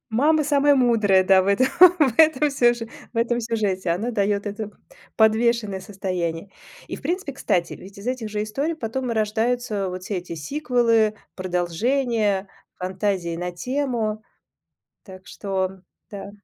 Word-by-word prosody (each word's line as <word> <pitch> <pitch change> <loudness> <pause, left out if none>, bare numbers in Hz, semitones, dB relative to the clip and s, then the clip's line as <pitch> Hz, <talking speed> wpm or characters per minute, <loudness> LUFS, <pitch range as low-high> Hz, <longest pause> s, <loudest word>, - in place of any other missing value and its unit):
Мама 300 +7 +3
самая 285 0 +4
мудрая, 220 -7 +3
да 190 0 +5
в - - -4
этом, 200 +6 +3 0.3
в 270 -7 +3
этом 305 -2 +5
сюж 240 -3 +3 0.3
в - - -13
этом 235 +1 +1
сюжете. 205 -6 -1
Она 210 +8 -1
дает 205 -1 0
это 205 +1 -5 0.5
подвешенное 220 -2 +2
состояние. 185 -3 -4 0.4
И - - -5
в - - -14
принципе, 355 -4 -2
кстати, 180 -9 -1
ведь 200 +1 -13
из 205 - -10
этих 250 -4 -2
же 210 0 -2
историй 280 +10 -2
потом 250 -1 -3
и - - -1
рождаются 220 -1 -1
вот 185 0 -6
все 200 - -3
эти 175 -1 -7
сиквелы, 230 - +1 0.2
продолжения, 200 +3 0 0.3
фантазии 185 -2 -2
на 180 +1 -4
тему. 230 0 -2 0.8
Так 185 -2 -13
что 190 -2 -3 0.3
да. 200 -1 -8
215 Hz, 145 wpm, -23 LUFS, 190-245 Hz, 0.8 s, да